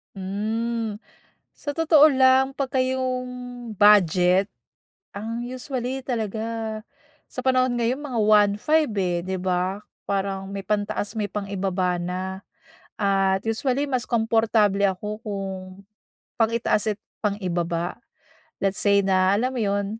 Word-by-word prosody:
Hmm. 220 +3 -2 0.6
Sa 290 - -5
totoo 315 -2 +6
lang, 265 0 +4
'pagka 265 -1 0
'yong 255 -1 -1 0.5
budget, 190 -1 +5 0.6
ang 230 +4 -4
usually 255 +1 -4
talaga 225 -2 -3 0.5
sa 255 0 -7
panahon 255 -1 +2
ngayon 240 +4 0
mga 260 -6 -3
1,500, 210 +8 +3
eh, 175 -3 0
'di 190 +1 -3
ba? 185 +2 -1 0.3
Parang 195 -1 -2
may 195 -1 -6
pantaas 205 0 -1
may 210 -3 -2
pang-ibaba 190 -3 -2
na. 180 +1 -3 0.8
At 195 -1 +1
usually 260 +5 0
mas 255 -3 0
komportable 225 -3 +2
ako 210 +4 -1
kung 195 -2 -4 0.9
pang-itaas 220 -2 +1
at - - -49 0.2
pang-ibaba. 175 -4 -2 0.6
Let's 195 -1 0
say 200 -1 +3
na 190 +1 +3
alam 255 +3 0
mo 250 - -2
'yon, 200 -1 0
210 Hz, 115 wpm, -24 LUFS, 195-245 Hz, 0.9 s, totoo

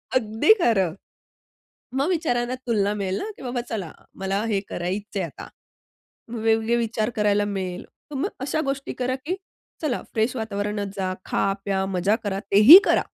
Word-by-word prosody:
अगदी 225 - +4
खरं. 195 - +2 1.0
मग 275 +6 0
विचारांना 255 -8 0
तुलना 205 -3 +1
मिळेल 195 -2 -2
ना - - -4
की - - -13
बाबा 245 -1 -2
चला. 195 -8 -4 0.2
मला 195 +2 -2
हे 210 -3 +1
करायचंय 195 +2 -3
आता. 165 - -8 0.8
मग 235 - -5
वेगवेगळे 225 +1 +2
विचार 225 -1 -1
करायला 205 -1 +2
मिळेल. 185 -3 -4 0.3
तर 285 - -6
मग 340 +10 -1
अशा 290 +3 -1
गोष्टी 275 0 -3
करा, 255 +1 -1
की 295 +8 -4 0.5
चला 285 -6 -1
फ्रेश 225 +3 0
वातावरणात 205 -2 -3
जा, 185 -1 -1
खा, 195 - 0
प्या, 190 -1 0
मजा 190 +2 +1
करा. 195 -1 -2
तेही 215 - +11
करा. - - +3
215 Hz, 160 wpm, -24 LUFS, 195-245 Hz, 1.0 s, तेही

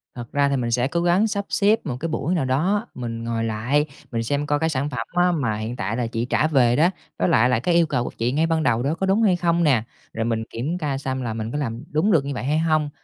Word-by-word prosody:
Thật 120 -1 -8
ra 140 0 +2
thì 140 - +1
mình 120 -2 -1
sẽ 125 +2 +2
cố 170 +3 -1
gắng 175 +5 +3
sắp 200 -2 -2
xếp 210 +2 +3
một 125 -4 -3
cái 165 +2 -3
buổi 160 +3 -1
nào 135 - 0
đó 180 +12 +1
mình 115 -2 -5
ngồi 115 -1 -2
lại, 120 +7 0 0.3
mình 115 -1 -1
xem 145 +5 -1
coi 145 0 +1
cái 160 0 +1
sản 140 0 -1
phẩm 120 -4 -4
á 180 0 +4
mà 125 -10 0
hiện 110 +3 -4
tại 105 +2 -3
là 120 -2 -1
chị 115 0 -2
trả 150 +5 +1
về 125 -6 +3
đó, 160 +6 +4 0.3
với 90 - +2
lại 120 +3 +4
là 125 - +2
cái 170 +6 +1
yêu 170 -1 +5
cầu 125 -5 0
của - - -4
chị 120 +2 0
ngay 155 +4 +2
ban 160 -1 +1
đầu 120 -4 +1
đó 150 +4 0
có 190 - -1
đúng 195 +4 +2
hay 195 -5 +4
không 170 -1 +1
nè. 130 -8 +3 0.3
Rồi 110 0 -2
mình 115 -1 -1
kiểm 140 +10 -3
ca 145 -5 -2
xăm 130 -1 -3
là 115 -3 -3
mình 110 0 -4
có 145 - -3
làm 120 -4 -3
đúng 160 +8 +2
được 150 -6 +3
như 140 - -3
vậy 125 - -4
hay 150 +4 +1
hông. 155 -2 +1
140 Hz, 295 wpm, -23 LUFS, 120-165 Hz, 0.3 s, yêu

